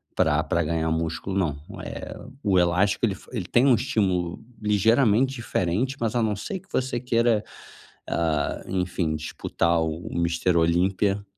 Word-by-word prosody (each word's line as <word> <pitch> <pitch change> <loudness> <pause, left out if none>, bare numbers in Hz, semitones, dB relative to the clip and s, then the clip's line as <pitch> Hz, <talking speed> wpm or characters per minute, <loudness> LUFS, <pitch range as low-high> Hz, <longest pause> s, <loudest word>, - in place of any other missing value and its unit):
pra 80 -1 +3
pra 85 +2 0
ganhar 80 +1 0
músculo 80 +4 -2
não, 75 -7 0 0.3
eh, - - -7 0.3
o 95 -3 +2
elástico 90 +5 +3
ele 110 - +1
f - - -14
ele 110 -6 -2
tem 120 +6 +3
um 130 -3 +6
estímulo 95 -7 0 0.2
ligeiramente 115 +5 +3
diferente, 115 +3 -1
mas 115 0 -1
a 120 - +2
não 110 -1 +1
ser 185 - -5
que 190 - -28
você 130 -1 -1
queira, 115 -2 +2 0.6
ah, 80 -3 -1
enfim, 90 -3 -1
disputar 85 +2 0
o 80 +1 -3
o - - -4
Mister 85 +1 +1
Olímpia, 95 +4 +2
95 Hz, 160 wpm, -25 LUFS, 85-115 Hz, 0.6 s, um